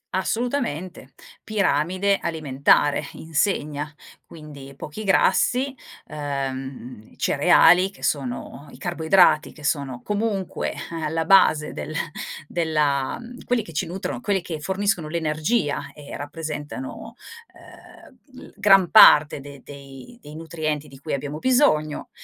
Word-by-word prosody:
Assolutamente! 190 - -3 0.3
Piramide 195 -1 +1
alimentare 145 -2 +1
insegna. 150 -3 -2 0.4
Quindi 145 -4 -11
pochi 150 +9 -8
grassi, 245 +7 +2 0.3
uhm, 135 -5 -6
cereali 180 +3 +4
che 195 - -19
sono 140 +1 -3
i - - -13
carboidrati 170 -1 +3
che 150 - -15
sono 140 -4 -2
comunque, 205 -3 -2
eh, - - -12 0.3
alla 160 +1 -1
base 155 -5 +4
del 155 - -6 0.5
della 150 - 0 0.3
quelli 245 -2 0
che 165 - -12
ci - - -1
nutrono, 190 +7 -5
quelli 200 -4 0
che 160 -3 -5
forniscono 190 -1 -1
l'energia 155 +2 -1
e 145 -1 -10
rappresentano, 155 - -7 0.4
uhm, 265 -4 -17
l - - -15
gran 195 -3 +5
parte 150 -9 +7
de 140 -1 -12
dei 140 - -12
dei 150 +1 -12
nutrienti 155 -2 -4
di 135 -1 -14
cui 155 - -5
abbiamo 145 +2 -4
bisogno, 160 - +1
155 Hz, 115 wpm, -23 LUFS, 145-195 Hz, 0.5 s, parte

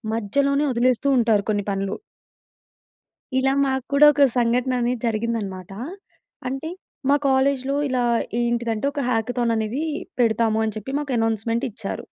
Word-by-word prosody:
మధ్యలోనే 280 +7 +1
వదిలేస్తూ 250 +3 +1
ఉంటారు 220 -4 +2
కొన్ని 205 -1 -1
పనులు. 195 0 -2 1.4
ఇలా 270 +1 +2
మాకు 265 -1 -1
కూడా, 285 +1 +7
ఒక 285 0 +5
సంఘటన 245 +2 +1
అనేది 240 0 0
జరిగిందనమాట. 215 -5 -3 0.8
అంటే, 270 +5 -4 0.4
మా 285 - +6
కాలేజ్‌లో 270 0 +2
ఇలా 255 -1 0 0.4
ఏంటిదంటే, 235 0 -1
ఒక 285 - -2
హ్యాకథాన్ 235 0 0
అనేది 220 +7 -2 0.4
పెడతాము 220 -1 +2
అని 215 - -3
చెప్పి, 265 +6 -6
మాకు 285 -3 -3
అనౌన్స్‌మెంట్ 225 +1 0
ఇచ్చారు. 215 - -6
240 Hz, 130 wpm, -23 LUFS, 220-265 Hz, 1.4 s, కూడా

